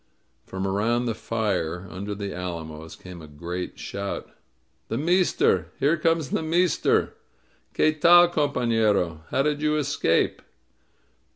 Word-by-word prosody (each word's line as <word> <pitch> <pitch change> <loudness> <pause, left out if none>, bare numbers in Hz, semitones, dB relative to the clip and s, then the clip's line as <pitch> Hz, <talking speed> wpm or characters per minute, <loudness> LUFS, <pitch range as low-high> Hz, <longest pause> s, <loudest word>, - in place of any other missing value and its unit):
'' - - -44
From 95 0 -4
around 110 +5 0
the 115 - 0
fire 95 -7 -2
under 100 +2 -5
the 100 -1 -5
alamos 80 -3 -6
came 90 -2 -11
a 80 - -11
great 85 +5 -6
shout: 100 0 -5 0.6
"The 115 - -3
meester! 160 - +2
Here 150 +4 +3
comes 165 -3 0
the - - 0
meester! 170 +1 +1 0.6
Qtie 155 -1 +2
tal, 175 +1 +8
compafierof 115 - +1
How 135 - +1
did 150 0 0
you 155 0 +1
escape?" 145 - +1
110 Hz, 130 wpm, -25 LUFS, 90-150 Hz, 0.6 s, tal